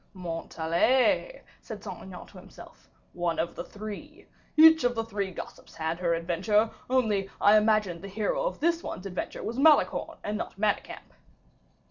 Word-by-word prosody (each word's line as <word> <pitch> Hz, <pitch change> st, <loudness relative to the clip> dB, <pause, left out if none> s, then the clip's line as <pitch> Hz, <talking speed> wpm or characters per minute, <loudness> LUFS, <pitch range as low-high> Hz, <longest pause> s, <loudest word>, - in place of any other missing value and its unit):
"Montalais," 180 Hz, -, 0 dB, 0.2 s
said -, -, -9 dB
Saint -, -, -7 dB
Aignan -, -, -10 dB
to -, -, -14 dB
himself, -, -, -15 dB, 0.2 s
"one 175 Hz, -2 st, -1 dB
of 170 Hz, +1 st, -1 dB
the 170 Hz, -, -6 dB
three. 210 Hz, +1 st, -9 dB, 0.3 s
Each 320 Hz, -1 st, +8 dB
of 245 Hz, 0 st, +1 dB
the 225 Hz, -, -1 dB
three 205 Hz, -3 st, -3 dB
gossips 180 Hz, -, -10 dB
had 160 Hz, +1 st, -3 dB
her 170 Hz, -2 st, +1 dB
adventure, 210 Hz, +6 st, +1 dB, 0.2 s
only 215 Hz, -7 st, +1 dB
I 205 Hz, +1 st, +6 dB
imagined 210 Hz, -5 st, +2 dB
the 195 Hz, -, -7 dB
hero 215 Hz, -, -1 dB
of -, -, -3 dB
this 335 Hz, +1 st, +1 dB
one's 185 Hz, -, -7 dB
adventure 185 Hz, -2 st, -5 dB
was 235 Hz, +3 st, -4 dB
Malicorne 305 Hz, +1 st, +3 dB
and 210 Hz, +1 st, -3 dB
not -, -, -6 dB
Manicamp." 210 Hz, 0 st, -2 dB
210 Hz, 160 wpm, -28 LUFS, 175-240 Hz, 0.3 s, Each